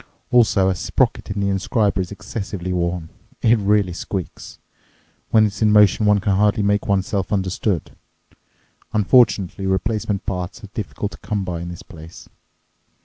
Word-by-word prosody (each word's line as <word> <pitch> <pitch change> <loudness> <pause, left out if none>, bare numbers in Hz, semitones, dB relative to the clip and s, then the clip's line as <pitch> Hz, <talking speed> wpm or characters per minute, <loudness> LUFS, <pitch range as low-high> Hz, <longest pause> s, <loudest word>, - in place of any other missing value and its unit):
Also 110 -6 +4
a 95 - +2
sprocket 90 - -1
in 100 0 -2
the 100 - +1
inscriber 100 +1 0
is 90 - -5
excessively 100 -3 -5
worn. 85 -2 -2 0.3
It 115 0 +4
really 100 -2 +2
squeaks. 95 0 -6 0.7
When 110 -1 +5
it's 105 +1 -4
in 110 -1 +4
motion 105 0 +5
one 105 0 +5
can 100 -1 0
hardly 105 +1 +2
make 105 0 +1
oneself 95 0 0
understood. 95 -2 -1 1.0
Unfortunately 100 -3 +3
replacement 100 +1 -1
parts 90 +3 -4
are 105 - -9
difficult 105 -1 -4
to - - -12
come 100 -1 -3
by 85 -2 -4
in 85 - -6
this 85 - -9
place. 80 -1 -13
100 Hz, 150 wpm, -21 LUFS, 95-105 Hz, 1.0 s, When